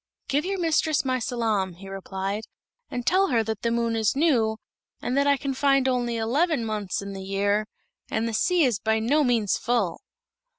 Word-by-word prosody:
"Give 290 Hz, +4 st, 0 dB
your 390 Hz, +1 st, -1 dB
mistress 320 Hz, -3 st, +1 dB
my 255 Hz, -1 st, +1 dB
salaam," 220 Hz, -6 st, -1 dB
he 195 Hz, +2 st, -12 dB
replied, 195 Hz, +2 st, -4 dB, 0.4 s
"and 245 Hz, -1 st, -4 dB
tell 385 Hz, +2 st, +4 dB
her 230 Hz, -4 st, +2 dB
that 220 Hz, -1 st, -4 dB
the 235 Hz, -, 0 dB
moon 230 Hz, 0 st, 0 dB
is 220 Hz, +1 st, +1 dB
new, 245 Hz, -8 st, +2 dB, 0.4 s
and 250 Hz, -, -2 dB
that 280 Hz, +1 st, +3 dB
I 280 Hz, 0 st, +4 dB
can 270 Hz, +1 st, -3 dB
find 275 Hz, 0 st, +3 dB
only 245 Hz, -2 st, 0 dB
eleven 265 Hz, +4 st, +1 dB
months 210 Hz, -3 st, -3 dB
in 200 Hz, 0 st, -6 dB
the 195 Hz, -, -6 dB
year, 200 Hz, +2 st, 0 dB, 0.4 s
and 220 Hz, +1 st, -1 dB
the 230 Hz, -, -3 dB
sea 355 Hz, +9 st, +3 dB
is 240 Hz, -7 st, +2 dB
by 220 Hz, +1 st, +1 dB
no 275 Hz, +8 st, +2 dB
means 235 Hz, -6 st, +2 dB
full." 235 Hz, -7 st, 0 dB
230 Hz, 195 wpm, -25 LUFS, 215-275 Hz, 0.4 s, tell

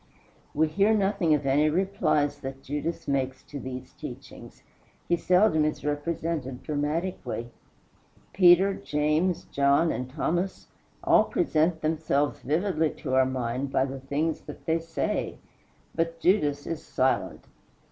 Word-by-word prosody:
We 160 Hz, +2 st, +3 dB
hear 200 Hz, +7 st, +3 dB
nothing 195 Hz, -6 st, +2 dB
of 145 Hz, -, -3 dB
any 145 Hz, +3 st, +3 dB
replies 150 Hz, -5 st, +1 dB
that 135 Hz, -1 st, -7 dB
Judas 150 Hz, +4 st, -4 dB
makes 135 Hz, -2 st, -1 dB
to 145 Hz, -, -8 dB
these 130 Hz, -1 st, -7 dB
teachings. -, -, -10 dB, 0.4 s
He 175 Hz, -, +3 dB
seldom 180 Hz, -2 st, +3 dB
is 150 Hz, -1 st, -2 dB
represented 150 Hz, -3 st, -3 dB
dramatically. 150 Hz, -5 st, -3 dB, 0.8 s
Peter, 185 Hz, +1 st, +6 dB
James, 155 Hz, +3 st, 0 dB
John, 140 Hz, +4 st, +3 dB
and 125 Hz, 0 st, -4 dB
Thomas, 175 Hz, +7 st, -2 dB, 0.4 s
all -, -, +5 dB
present 160 Hz, -, +1 dB
themselves 155 Hz, -2 st, 0 dB
vividly 160 Hz, +2 st, 0 dB
to 130 Hz, -4 st, -5 dB
our 130 Hz, 0 st, +4 dB
mind 130 Hz, +1 st, -2 dB
by 130 Hz, -, +2 dB
the 135 Hz, 0 st, -6 dB
things 145 Hz, +4 st, -2 dB
that -, -, -10 dB
they 165 Hz, +1 st, +1 dB
say; 165 Hz, 0 st, -3 dB, 0.6 s
but 165 Hz, 0 st, -2 dB
Judas 150 Hz, -7 st, +2 dB
is 165 Hz, -2 st, -4 dB
silent. 130 Hz, 0 st, -1 dB
155 Hz, 130 wpm, -27 LUFS, 140-170 Hz, 0.8 s, Peter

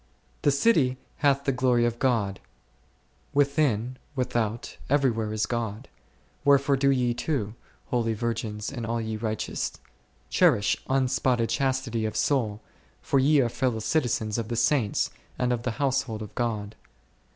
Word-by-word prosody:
The -, -, +3 dB
city 140 Hz, -, +3 dB, 0.2 s
hath 140 Hz, -1 st, +2 dB
the 140 Hz, -, +1 dB
glory 125 Hz, -2 st, +2 dB
of 120 Hz, 0 st, -1 dB
God; 110 Hz, -7 st, +1 dB, 1.0 s
within, 140 Hz, -4 st, +2 dB, 0.2 s
with 125 Hz, -1 st, -2 dB
out, 115 Hz, 0 st, -2 dB
everywhere 120 Hz, -6 st, +2 dB
is 110 Hz, 0 st, 0 dB
God; 115 Hz, +1 st, -4 dB, 0.5 s
wherefore 140 Hz, 0 st, +4 dB
do 140 Hz, +1 st, +2 dB
ye 125 Hz, -3 st, +2 dB
too, 120 Hz, -4 st, -2 dB, 0.4 s
holy 115 Hz, -2 st, +1 dB
virgins 110 Hz, -1 st, -3 dB
and 125 Hz, -4 st, -5 dB
all 115 Hz, +1 st, -1 dB
ye 110 Hz, -1 st, -3 dB
righteous, 110 Hz, -1 st, -3 dB, 0.5 s
cherish 100 Hz, -, +3 dB
unspotted 130 Hz, -3 st, +1 dB
chastity 130 Hz, -2 st, 0 dB
of 110 Hz, 0 st, -3 dB
soul, 105 Hz, -1 st, +1 dB, 0.4 s
for 140 Hz, -, +1 dB
ye 145 Hz, +2 st, +5 dB
are 120 Hz, -, +2 dB
fellow 125 Hz, 0 st, -1 dB
citizens 110 Hz, -3 st, 0 dB
of 115 Hz, -, -3 dB
the 120 Hz, -, -3 dB
Saints, 115 Hz, -2 st, +1 dB, 0.3 s
and 125 Hz, 0 st, +1 dB
of 120 Hz, -, -2 dB
the 125 Hz, -, -2 dB
household 130 Hz, -6 st, 0 dB
of 105 Hz, 0 st, -10 dB
God?. 110 Hz, -3 st, -2 dB
120 Hz, 145 wpm, -26 LUFS, 110-135 Hz, 1.0 s, ye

